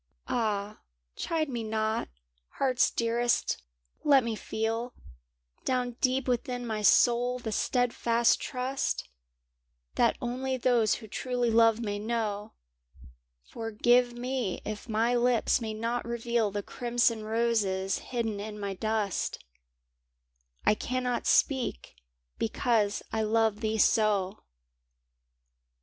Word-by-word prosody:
w - - -2
Ah, 210 -3 -1 0.4
chide 320 -2 -1
me 240 -4 -3
not, 220 - -1 0.4
Heart's 260 -2 +2
Dearest 235 +1 0 0.2
— - - -42
let 270 -2 +7
me 230 -1 -2
feel 225 +3 -3 0.7
Down 250 -1 0
deep 260 0 +1
within 245 0 -1
my 220 -2 -2
soul 245 +3 +4
the 235 -3 -5
stead 245 +3 +1
fast 235 0 +2
trust 265 +1 -2 0.9
That - - +2
only 260 +2 -2
those 235 -4 +3
who 220 - -10
truly 245 +2 -1
love 225 0 +4
may 205 -2 -2
know; 215 -2 -2 0.9
Forgive 240 - +1
me 245 -4 -3
if 215 +2 -6
my 225 +2 +2
lips 245 0 +2
may 220 -1 -3
not 230 +2 -2
reveal 235 -2 0
The 205 0 -4
crimson 240 -2 0
roses 215 -4 0
hidden 225 -4 -3
in 210 0 -6
my 200 -1 -3
dust 215 0 -1 0.6
— - - -38
I - - +5
cannot 250 +2 -2
speak 260 - +1 0.5
because 220 -2 +1
I 220 - +1
love 220 -1 +2
thee 220 -1 -1
so! 210 -2 +2
230 Hz, 120 wpm, -29 LUFS, 215-245 Hz, 0.9 s, let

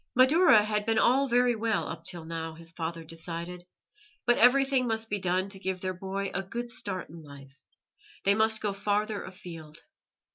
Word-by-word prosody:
Madaura 260 - +6
had 210 0 -1
been 225 0 +2
all 265 +5 +4
very 245 -1 +3
well 220 -1 -1
up - - -7
till 170 -3 -4
now, 165 0 -5
his 165 0 -8
father 165 0 -5
decided, 170 +2 -6 0.6
but 240 - +3
everything 265 +1 +4
must 225 -1 -2
be 205 - 0
done 185 +1 0
to 195 -1 -8
give 190 -1 -3
their 185 0 -3
boy 195 +2 -4
a 195 - -1
good 235 +6 -5
start 190 -5 -3
in 165 0 -10
life; 140 -2 -13 0.7
they 200 - +4
must 220 +1 +2
go 205 -2 -1
farther 205 +1 -1
afield. 165 -4 -10
195 Hz, 180 wpm, -28 LUFS, 170-225 Hz, 0.7 s, Madaura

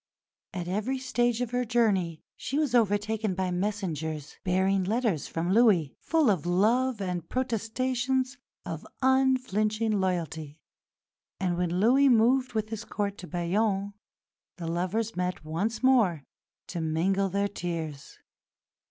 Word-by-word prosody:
At 175 -2 -5
every 215 +8 -1
stage 245 -2 0
of 245 -2 -2
her 250 0 +1
journey 205 -9 +1
she 275 - -3
was 300 -5 +1
overtaken 215 -2 +1
by 185 -1 -1
messengers 165 -6 -3
bearing 190 +1 +2
letters 215 - 0
from 170 +3 -1
Louis, 200 - +4
full 315 -8 +2
of 175 -4 -1
love 225 +7 +2
and 180 -3 -3
protestations 255 +2 -1 0.3
of - - -5 0.2
unflinching 255 -5 +2
loyalty; 160 -5 -2 0.8
and 180 -2 0
when 175 0 -1
Louis 265 +7 +5
moved 250 +2 +3
with 215 -1 -1
his 225 0 -5
Court 205 -3 -3
to 180 - -8
Bayonne, 195 +3 0 0.6
the 170 - -6
lovers 185 +7 -1
met 180 -3 -2
once 200 +11 -2
more 215 - +4 0.5
to 170 - -3
mingle 185 +5 +1
their 200 +2 0
tears. 165 -7 -5
200 Hz, 130 wpm, -28 LUFS, 180-240 Hz, 0.8 s, Louis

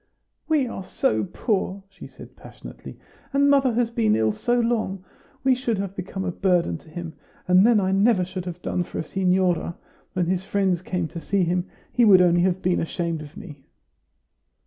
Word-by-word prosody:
"We 310 -4 +2
are 230 -5 -6
so 110 - 0
poor!" 195 - -2
she 195 0 -12
said - - -14
passionately; - - -12 0.4
"and 280 0 +4
mother 270 -3 +3
has 235 0 0
been 225 -3 +2
ill 110 -1 +2
so 240 - 0
long, 215 -5 -1 0.4
we 265 0 +4
should 245 -3 -1
have 195 0 -4
become 190 +1 -5
a 180 - -1
burden 175 - +1
to - - -18
him. 165 0 -7 0.3
And 180 +1 +6
then 235 -3 +5
I 190 -1 0
never 195 -1 +3
should 185 0 -6
have 180 -1 -7
done 180 - -1
for 175 - -6
a - - -2
signora. 180 -1 0 0.4
When 185 -3 0
his 180 +1 -1
friends 190 -3 0
came 180 -2 -2
to 170 - -7
see 195 +3 0
him, 175 +1 0 0.3
he 245 - +3
would 200 -4 +7
only 175 -1 +4
have 185 0 0
been 180 0 +2
ashamed 165 -1 -3
of 150 +4 -11
me." 160 -10 -10
185 Hz, 190 wpm, -24 LUFS, 175-210 Hz, 0.4 s, would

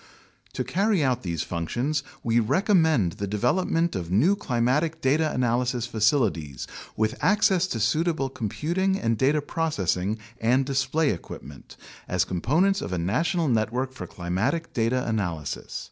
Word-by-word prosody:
To - - -2
carry 195 -3 +1
out 125 -2 +1
these 85 -4 -2
functions 120 - -2 0.2
we 115 0 +2
recommend 160 - +3
the 100 +4 -5
development 165 - +1
of 85 -3 -4
new 135 - +4
climatic 145 +2 0
data 155 +3 +2
analysis 125 -1 0
facilities 105 - 0 0.3
with 110 0 +1
access 195 -3 +3
to 120 - -3
suitable 155 +5 +1
computing 170 - -1
and 115 0 +1
data 140 +6 +2
processing 110 - -1 0.2
and 125 +4 +2
display 135 +3 +1
equipment, 75 -5 -9 0.3
as - - +1
components 165 - +1
of - - -5
a - - 0
national 160 - 0
network 125 +2 0
for 130 - -7
climatic 100 - -2
data 120 +2 0
analysis. 90 -10 -3
125 Hz, 135 wpm, -25 LUFS, 105-160 Hz, 0.3 s, new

